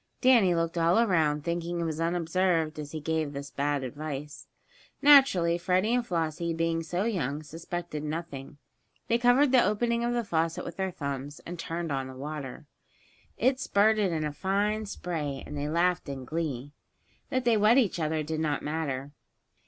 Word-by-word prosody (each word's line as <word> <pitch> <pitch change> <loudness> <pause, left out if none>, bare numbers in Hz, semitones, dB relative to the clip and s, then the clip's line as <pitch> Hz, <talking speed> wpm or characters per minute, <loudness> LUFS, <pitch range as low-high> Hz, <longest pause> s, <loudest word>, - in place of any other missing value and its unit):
Danny 235 -9 +5
looked 165 0 -1
all 170 +3 +3
around, 160 -10 +2
thinking 170 +1 -2
he 170 - -1
was 160 -1 -3
unobserved 165 -1 0
as 150 -1 -6
he 155 - -4
gave 155 -1 -1
this 140 0 -6
bad 145 -1 -1
advice. 145 +2 -6 0.5
Naturally, 265 - +6
Freddie 185 +5 +1
and 245 0 +2
Flossie, 165 -4 -2
being 165 0 0
so 175 +3 -2
young, 155 - -2
suspected 165 0 -6
nothing. 150 -2 -5 0.5
They 235 0 +3
covered 250 +3 +4
the 255 -2 +6
opening 235 +2 +1
of 240 0 0
the 240 - 0
faucet 165 -4 -1
with - - -7
their 190 0 -1
thumbs, 140 -4 -5
and 175 0 -7
turned 165 -1 -3
on 135 -1 -2
the 130 - -9
water. 145 0 -6 0.7
It 260 +1 +2
spurted 210 -5 +3
in 160 -2 -1
a 150 - -3
fine 205 +5 0
spray, 155 -8 -4
and - - -8
they 145 +1 -2
laughed 175 0 +1
in 135 -2 -6
glee. 145 -2 -3 0.6
That 255 -2 -1
they 235 -2 +4
wet 215 +4 +5
each 215 -9 +2
other 155 -1 0
did 155 +1 -3
not 150 -2 -1
matter. 145 -3 -3
165 Hz, 175 wpm, -28 LUFS, 150-190 Hz, 0.7 s, Naturally